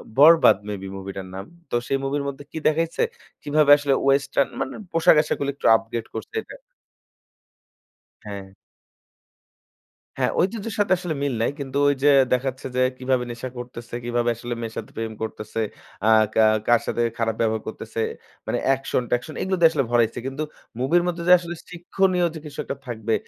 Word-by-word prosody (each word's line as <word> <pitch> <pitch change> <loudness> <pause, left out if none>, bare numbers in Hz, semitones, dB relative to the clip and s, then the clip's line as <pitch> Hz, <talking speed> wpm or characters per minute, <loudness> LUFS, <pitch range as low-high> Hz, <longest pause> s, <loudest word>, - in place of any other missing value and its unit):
'বরবাদ' 160 -5 +7
maybe 95 -2 -5
মুভিটার 95 0 -7
নাম। 95 +1 -6 0.2
তো - - -2
সেই 135 - +1
মুভির 140 +1 -1
মধ্যে 140 0 -6
কি - - -7
দেখাইছে? 165 - +1 0.4
কিভাবে 145 0 +3
আসলে 145 -1 +1
ওয়েস্টার্ন 140 0 +2
মানে 135 - -3 0.2
পোশাকআশাক 160 -2 +4
গুলো 140 0 -1
একটু - - -10
আপডেট 115 0 -3
করছে 435 - -7
এটা। - - -12 1.7
হ্যাঁ। 100 -2 -8 1.6
হ্যাঁ, - - +1
ঐতিহ্যের 210 +2 -1
সাথে 205 -2 +3
আসলে 175 -2 -3
মিল 140 - 0
নাই। 115 - +1
কিন্তু 140 -1 -4
ঐযে 145 0 +3 0.2
দেখাচ্ছে 130 +1 -1
যে 130 - +2 0.2
কিভাবে 130 -1 0
নেশা 120 +2 -6
করতেছে? 120 -1 -8
কিভাবে 120 0 0
আসলে 120 +1 -5
মেয়ের 115 -1 -5
সাথে 110 - -6
প্রেম 115 -1 -4
করতেছে? 110 0 -5 0.5
আ - - +3 0.3
কা 110 - +4 0.2
কার 120 -1 +5
সাথে 120 - -1 0.2
খারাপ 115 -1 0
ব্যবহার 110 -1 +1
করতেছে? 110 +1 -6 0.5
মানে - - 0
অ্যাকশন-ট্যাকশন 130 0 0
এগুলো 190 0 0
দিয়ে 165 -1 +7
আসলে 145 -4 +1
ভরাইছে। 120 -2 +2
কিন্তু 135 +3 -3 0.4
মুভির 165 +7 +3
মধ্যে 170 -1 -2
যে 180 - +8
আসলে 175 0 -6 0.2
শিক্ষণীয় 180 +1 +1
যে - - -5
কিছু 145 -2 -10
একটা 140 - -4
থাকবে, 110 -1 -2
135 Hz, 160 wpm, -23 LUFS, 115-155 Hz, 1.7 s, যে